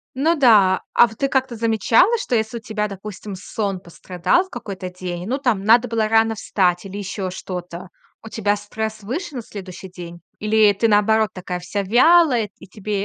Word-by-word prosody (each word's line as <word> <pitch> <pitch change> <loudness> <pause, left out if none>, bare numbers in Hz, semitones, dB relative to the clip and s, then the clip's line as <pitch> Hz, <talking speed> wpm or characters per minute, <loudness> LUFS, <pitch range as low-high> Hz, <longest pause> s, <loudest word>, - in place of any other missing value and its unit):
Ну 320 +6 +2
да. 210 -8 +5
А 240 - +6
в 220 - -13
ты 275 - 0
как-то 260 -3 -1
замечала, 230 - +3
что 425 - -3
если 220 +2 -2
у - - -14
тебя, 215 -1 -3
допустим, 200 0 -8
сон 195 0 -4
пострадал 180 - -1
в 380 - -20
какой-то 195 -6 -7
день, 180 -1 -6
ну, 255 +5 -1
там 240 -8 0
надо 235 +3 +5
было 225 -1 0
рано 225 0 +3
встать 180 -4 0
или 195 +1 -7
ещё 195 -1 -4
что-то. 180 -1 -7 0.3
У 225 - -9
тебя 205 -2 0
стресс 220 +1 -5
выше 265 - -5
на 240 - -4
следующий 190 -3 -9
день, 175 -1 -10 0.2
или 215 0 +3
ты, 230 - +1
наоборот, 215 0 +3
такая 180 -1 -5
вся 200 +3 -3
вялая 245 - +4
и - - -13
тебе 205 0 -4
210 Hz, 190 wpm, -21 LUFS, 190-230 Hz, 0.3 s, А